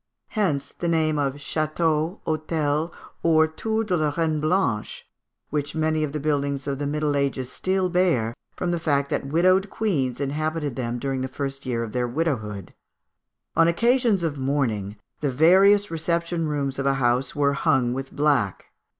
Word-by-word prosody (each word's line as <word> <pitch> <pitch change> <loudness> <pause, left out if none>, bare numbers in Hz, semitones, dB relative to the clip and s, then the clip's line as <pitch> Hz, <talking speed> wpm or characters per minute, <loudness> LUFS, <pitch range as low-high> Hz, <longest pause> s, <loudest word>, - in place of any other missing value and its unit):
Hence 175 -11 -1
the 175 - -4
name 155 -2 +1
of 140 -1 0
château, 155 +3 -1
hôtel, 155 0 -1 0.3
or 160 -1 +4
tour 220 +8 -2
de 195 -4 0
la 155 -3 +1
Reine 160 -2 +1
Blanche, 155 - 0 0.4
which 145 0 -2
many 155 0 +1
of 150 - -2
the 150 - -3
buildings 140 -2 -1
of 140 -1 -3
the 145 - -1
Middle 150 0 0
Ages 135 -2 -1
still 185 0 0
bear, 170 -11 +1 0.2
from 180 - -2
the 170 - 0
fact 140 -3 0
that 140 - -1
widowed 185 +6 +3
queens 145 - -1
inhabited 150 0 -2
them 120 -2 -2
during 135 +1 -2
the 130 - -1
first 135 0 -5
year 115 -2 -1
of 115 - -6
their 125 0 -1
widowhood. 120 - -2 0.8
On 165 - +5
occasions 230 +2 +2
of 150 -4 -2
mourning, 120 -8 -1 0.2
the 145 - 0
various 190 +9 +5
reception 170 0 -1
rooms 140 -2 -2
of 135 - 0
a 135 - +3
house 125 0 +1
were 140 -1 +2
hung 130 -5 +2
with 135 +1 -5
black. 140 -10 0
150 Hz, 165 wpm, -24 LUFS, 135-165 Hz, 0.8 s, On